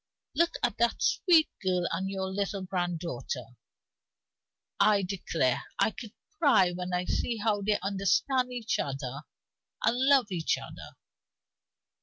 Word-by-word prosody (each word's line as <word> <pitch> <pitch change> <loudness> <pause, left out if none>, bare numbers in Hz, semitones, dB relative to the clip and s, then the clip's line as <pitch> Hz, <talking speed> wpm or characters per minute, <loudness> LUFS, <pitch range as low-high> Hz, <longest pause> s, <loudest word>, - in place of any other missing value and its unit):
Look 340 +4 +2
at 240 -4 0
that 235 0 +2
sweet 335 -4 +4
girl 180 -2 +1
and 190 +3 -2
your 190 -1 -3
little 195 0 -3
granddaughter! 170 - -3 1.3
I 205 -2 +4
declare 165 -9 -1
I - - +2
could 220 0 -10 0.3
cry 195 - +5
when 180 +1 -5
I 180 0 -1
see 235 +4 -1
how 210 -1 0
they 205 +1 +1
understand 205 +7 +1
each 240 -3 -2
other 135 -1 -4 0.6
and 230 - +3
love 265 -3 +3
each 170 -3 0
other. - - -10
195 Hz, 130 wpm, -29 LUFS, 180-230 Hz, 1.3 s, cry